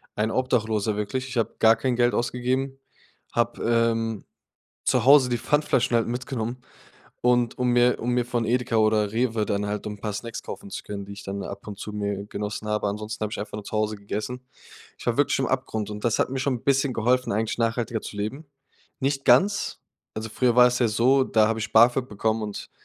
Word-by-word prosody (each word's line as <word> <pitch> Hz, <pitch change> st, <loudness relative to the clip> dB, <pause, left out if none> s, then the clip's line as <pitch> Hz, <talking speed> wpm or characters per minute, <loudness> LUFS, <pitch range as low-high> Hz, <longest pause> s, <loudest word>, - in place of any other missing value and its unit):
ein 110 Hz, +1 st, 0 dB
Obdachloser 110 Hz, -4 st, 0 dB
wirklich. 130 Hz, +5 st, -3 dB
Ich 125 Hz, -, -5 dB
habe 115 Hz, -, 0 dB
gar 110 Hz, 0 st, +6 dB
kein 125 Hz, +2 st, -1 dB
Geld 120 Hz, 0 st, +3 dB
ausgegeben. 130 Hz, +2 st, -1 dB, 0.6 s
Habe, 120 Hz, 0 st, 0 dB
ähm, 115 Hz, -2 st, +1 dB, 0.6 s
zu 125 Hz, -3 st, +2 dB
Hause 135 Hz, -1 st, +7 dB
die 120 Hz, -1 st, 0 dB
Pfandflaschen 130 Hz, -3 st, +1 dB
halt 115 Hz, -, +1 dB
mitgenommen 120 Hz, 0 st, -3 dB, 0.6 s
und 120 Hz, -1 st, +2 dB
um 125 Hz, 0 st, +1 dB
mir 120 Hz, 0 st, +4 dB
um 120 Hz, -, -1 dB
mir 125 Hz, 0 st, +1 dB
von 120 Hz, -1 st, -1 dB
Edeka 120 Hz, 0 st, 0 dB
oder 110 Hz, -1 st, +2 dB
Rewe 115 Hz, -2 st, +1 dB
dann 100 Hz, 0 st, -1 dB
halt 105 Hz, 0 st, -3 dB
so 105 Hz, -, -4 dB
'n 105 Hz, -, -8 dB
paar 105 Hz, -1 st, -3 dB
Snacks 115 Hz, +2 st, -5 dB
kaufen 200 Hz, -, -8 dB
zu -, -, -5 dB
können, 100 Hz, -1 st, -6 dB
die 100 Hz, -, -9 dB
ich 100 Hz, 0 st, -9 dB
dann 100 Hz, 0 st, -5 dB
ab 100 Hz, 0 st, -8 dB
und 105 Hz, -2 st, -7 dB
zu 105 Hz, -, -6 dB
mir 100 Hz, -1 st, -3 dB
genossen 105 Hz, +1 st, -5 dB
habe. 105 Hz, 0 st, 0 dB
Ansonsten 105 Hz, +1 st, -5 dB
habe 105 Hz, -, -1 dB
ich -, -, -5 dB
einfach 105 Hz, +1 st, -6 dB
nur 105 Hz, -, -7 dB
zu -, -, -10 dB
Hause 110 Hz, 0 st, 0 dB
gegessen. 110 Hz, +5 st, -5 dB, 0.5 s
Ich -, -, -11 dB
war 120 Hz, +1 st, 0 dB
wirklich 145 Hz, 0 st, +3 dB
am 135 Hz, -, +1 dB
Abgrund. 110 Hz, -5 st, -2 dB
Und 105 Hz, 0 st, -7 dB
das 115 Hz, -2 st, +2 dB
hat -, -, +1 dB
mir 135 Hz, -, -2 dB
schon 130 Hz, 0 st, 0 dB
'n -, -, -23 dB
bisschen 135 Hz, -1 st, +2 dB
geholfen, 125 Hz, +2 st, +1 dB
eigentlich 110 Hz, +2 st, -1 dB
nachhaltiger 115 Hz, 0 st, 0 dB
zu 105 Hz, -, -8 dB
leben. 110 Hz, +10 st, -4 dB, 0.5 s
Nicht 135 Hz, 0 st, -1 dB
ganz. 190 Hz, +12 st, +3 dB, 0.3 s
Also, 110 Hz, +1 st, -4 dB
früher 125 Hz, +1 st, +1 dB
war 125 Hz, 0 st, +8 dB
es 125 Hz, 0 st, +1 dB
ja 120 Hz, -, +3 dB
so, 125 Hz, +5 st, +3 dB
da 110 Hz, -3 st, +3 dB
habe 115 Hz, 0 st, -1 dB
ich 105 Hz, -1 st, -4 dB
BAföG 120 Hz, +3 st, +5 dB
bekommen 110 Hz, +2 st, -1 dB
und 105 Hz, -1 st, -6 dB
115 Hz, 220 wpm, -25 LUFS, 105-125 Hz, 0.6 s, war